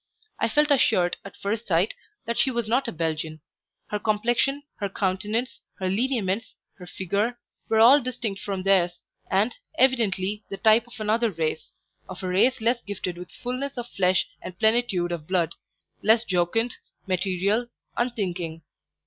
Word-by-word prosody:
I -, -, +1 dB
felt 295 Hz, +5 st, +3 dB
assured, 185 Hz, -10 st, +3 dB
at 200 Hz, -, -11 dB
first 215 Hz, +3 st, -3 dB
sight, 180 Hz, +3 st, +2 dB, 0.3 s
that 235 Hz, +1 st, -2 dB
she -, -, +4 dB
was 235 Hz, -3 st, -1 dB
not 250 Hz, +4 st, +2 dB
a -, -, -2 dB
Belgian; 160 Hz, -1 st, -2 dB, 0.5 s
her 210 Hz, -, 0 dB
complexion, 240 Hz, +7 st, +1 dB
her 200 Hz, -2 st, -2 dB
countenance, 210 Hz, +6 st, -1 dB, 0.2 s
her 190 Hz, -, -2 dB
lineaments, 225 Hz, 0 st, 0 dB, 0.2 s
her 180 Hz, -, -10 dB
figure, 200 Hz, +7 st, -1 dB, 0.3 s
were 225 Hz, -, +3 dB
all 250 Hz, +6 st, +8 dB
distinct 240 Hz, -5 st, -4 dB
from 195 Hz, -2 st, -3 dB
theirs, 180 Hz, -3 st, +3 dB, 0.3 s
and, 205 Hz, +5 st, +2 dB, 0.2 s
evidently, 210 Hz, -6 st, +2 dB
the 195 Hz, -, -5 dB
type 220 Hz, +2 st, +4 dB
of 240 Hz, -1 st, -11 dB
another 220 Hz, +2 st, +2 dB
race 160 Hz, -4 st, -3 dB, 0.4 s
of 185 Hz, +1 st, -8 dB
a -, -, -1 dB
race 220 Hz, +8 st, +3 dB
less 235 Hz, +2 st, +2 dB
gifted 195 Hz, -4 st, -4 dB
with 180 Hz, 0 st, -9 dB
fullness 255 Hz, +2 st, -4 dB
of 240 Hz, 0 st, -5 dB
flesh 185 Hz, -3 st, +2 dB, 0.2 s
and 180 Hz, -1 st, -8 dB
plenitude 220 Hz, -6 st, +2 dB
of 160 Hz, -3 st, -4 dB
blood; 170 Hz, -3 st, +1 dB, 0.5 s
less 220 Hz, +2 st, +5 dB
jocund, 210 Hz, +5 st, 0 dB, 0.3 s
material, 195 Hz, +4 st, 0 dB, 0.3 s
unthinking. 180 Hz, -9 st, -2 dB
210 Hz, 155 wpm, -25 LUFS, 185-235 Hz, 0.5 s, all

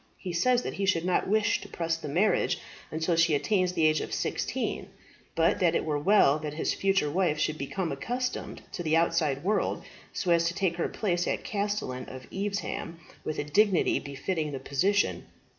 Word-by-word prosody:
He 180 Hz, -, -5 dB
says 250 Hz, +8 st, +3 dB
that -, -, -4 dB
he 195 Hz, 0 st, -2 dB
should 170 Hz, -3 st, +2 dB
not 180 Hz, -, +1 dB
wish 215 Hz, +2 st, +2 dB
to -, -, -10 dB
press 165 Hz, -1 st, -1 dB
the 165 Hz, -, -7 dB
marriage 180 Hz, +9 st, +2 dB, 0.3 s
until 160 Hz, +2 st, 0 dB
she 165 Hz, -2 st, +4 dB
attains 185 Hz, +3 st, +1 dB
the 160 Hz, -, +2 dB
age 155 Hz, -1 st, +3 dB
of -, -, -3 dB
sixteen, -, -, -2 dB, 0.5 s
but -, -, +3 dB
that -, -, +3 dB
it -, -, 0 dB
were 150 Hz, -2 st, 0 dB
well 155 Hz, -4 st, +4 dB
that 150 Hz, -1 st, -5 dB
his 160 Hz, -, 0 dB
future 195 Hz, -6 st, +1 dB
wife 175 Hz, -2 st, +1 dB
should 155 Hz, 0 st, -1 dB
become 165 Hz, +4 st, -2 dB
accustomed 245 Hz, -, -3 dB
to 180 Hz, -, -5 dB
the 160 Hz, -1 st, +2 dB
outside 160 Hz, -4 st, +1 dB
world, 210 Hz, +4 st, 0 dB, 0.3 s
so 180 Hz, -, -1 dB
as 170 Hz, 0 st, +4 dB
to 170 Hz, -, -2 dB
take 185 Hz, -3 st, 0 dB
her 170 Hz, -, 0 dB
place 175 Hz, -5 st, -1 dB
as -, -, -1 dB
Castellan 200 Hz, -, -2 dB
of 130 Hz, -1 st, -9 dB
Evesham 195 Hz, -4 st, -3 dB, 0.2 s
with 155 Hz, -, -3 dB
a -, -, -1 dB
dignity 185 Hz, +4 st, +3 dB
befitting 150 Hz, +2 st, -3 dB
the 135 Hz, -, -4 dB
position. 185 Hz, +10 st, +1 dB
170 Hz, 195 wpm, -28 LUFS, 155-195 Hz, 0.5 s, she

